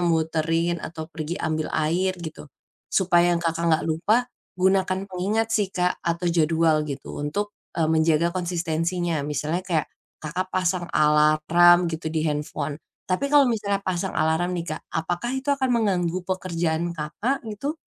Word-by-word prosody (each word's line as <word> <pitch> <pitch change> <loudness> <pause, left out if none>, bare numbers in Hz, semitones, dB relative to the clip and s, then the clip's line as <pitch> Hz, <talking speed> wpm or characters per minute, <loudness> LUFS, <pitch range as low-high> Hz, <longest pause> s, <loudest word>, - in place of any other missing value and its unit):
muterin 165 0 +1
atau 160 -1 -6
pergi 160 +2 -4
ambil 155 -1 -2
air, 180 +5 +1
gitu. 155 -2 -8 0.4
Supaya 175 -2 +3
Kakak 165 0 -1
enggak 160 0 +2
lupa, 165 +7 +2 0.4
gunakan 190 0 +2
pengingat 210 +5 -1
sih, 210 -3 +2
Kak, 180 -1 0
atau 170 +1 -2
jadwal 160 -1 +2
gitu 140 - -6
untuk, 180 +9 -2 0.3
e 165 - +2
menjaga 160 +1 +3
konsistensinya, 170 -1 -1
misalnya 150 +4 -1
kayak 165 -5 0 0.4
Kakak 170 +5 -2
pasang 185 -1 0
alarm 155 +4 +5
gitu, 160 0 -5
di 160 0 -1
handphone. 150 -1 -2 0.3
Tapi 185 +9 0
kalau 290 0 +6
misalnya 200 -3 -1
pasang 185 +1 -2
alarm 165 +3 +1
nih, 170 - -3
Kak, - - -5
apakah 175 +10 -2
itu 270 +2 -2
akan 270 -2 0
mengganggu 185 -6 +1
pekerjaan 170 -2 -1
Kakak, 210 - -2
gitu? 275 +9 -3
170 Hz, 145 wpm, -24 LUFS, 160-185 Hz, 0.4 s, kalau